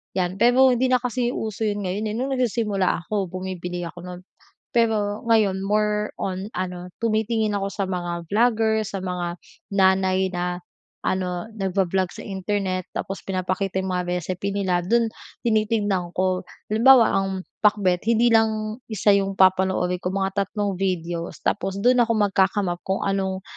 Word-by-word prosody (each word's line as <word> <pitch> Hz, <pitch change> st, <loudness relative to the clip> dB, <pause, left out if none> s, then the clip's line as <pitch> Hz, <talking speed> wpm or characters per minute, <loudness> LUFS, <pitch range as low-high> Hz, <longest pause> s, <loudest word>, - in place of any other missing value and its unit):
yan. 185 Hz, 0 st, -1 dB
Pero 255 Hz, +3 st, +6 dB
hindi 250 Hz, +1 st, +2 dB
na 255 Hz, -1 st, +2 dB
kasi 245 Hz, 0 st, -1 dB
uso 220 Hz, 0 st, -2 dB
yun 205 Hz, -1 st, -2 dB
ngayon 210 Hz, +3 st, -2 dB
nung 260 Hz, +4 st, -2 dB
nagsisimula 215 Hz, -8 st, 0 dB
ako 200 Hz, +1 st, -2 dB
bumibili 180 Hz, -1 st, -5 dB
ako 170 Hz, +1 st, -7 dB
nun. 180 Hz, 0 st, -8 dB, 0.5 s
Pero 215 Hz, -3 st, +1 dB
ngayon 200 Hz, -4 st, +3 dB
more 210 Hz, +1 st, +1 dB
on 190 Hz, +2 st, -3 dB
ano 180 Hz, -1 st, -4 dB
tumitingin 220 Hz, -1 st, 0 dB
ako 200 Hz, 0 st, -1 dB
sa 195 Hz, -1 st, -2 dB
mga 175 Hz, -2 st, -4 dB
vlogger, 220 Hz, +1 st, +2 dB
sa 200 Hz, -1 st, -5 dB
mga 180 Hz, -2 st, -3 dB, 0.4 s
nanay 190 Hz, -1 st, +3 dB
na 180 Hz, 0 st, -2 dB, 0.5 s
ano 180 Hz, 0 st, -2 dB
nag-vo-vlog 190 Hz, -2 st, 0 dB
sa -, -, -9 dB
Internet, 190 Hz, -1 st, -2 dB
tapos 195 Hz, -, -5 dB
pinapakita 185 Hz, 0 st, -2 dB
yung 190 Hz, -1 st, -2 dB
mga 180 Hz, 0 st, -1 dB
recipe 185 Hz, +3 st, -3 dB
nila, 190 Hz, -3 st, 0 dB
dun 230 Hz, +5 st, +3 dB, 0.4 s
tinitignan 210 Hz, -5 st, +1 dB
ko. 185 Hz, 0 st, +1 dB, 0.3 s
Halimbawa 235 Hz, +2 st, +6 dB
ang 195 Hz, 0 st, +1 dB, 0.3 s
Pakbet 200 Hz, -3 st, +2 dB
hindi 235 Hz, +1 st, +4 dB
lang 220 Hz, -1 st, +2 dB
isa 215 Hz, -2 st, +1 dB
yung 195 Hz, -1 st, +2 dB
papanoorin 185 Hz, -1 st, +3 dB
ko 180 Hz, +1 st, -3 dB
mga 195 Hz, -1 st, 0 dB, 0.2 s
3 200 Hz, -2 st, -2 dB
videos 175 Hz, -3 st, -3 dB
tapos 190 Hz, +1 st, -1 dB
dun 250 Hz, +2 st, +4 dB
ako 230 Hz, -1 st, +3 dB
magka-come 200 Hz, -2 st, +2 dB
up 175 Hz, -, -3 dB
kung 190 Hz, 0 st, -1 dB
anong 190 Hz, -1 st, -1 dB
195 Hz, 155 wpm, -23 LUFS, 185-215 Hz, 0.5 s, Pero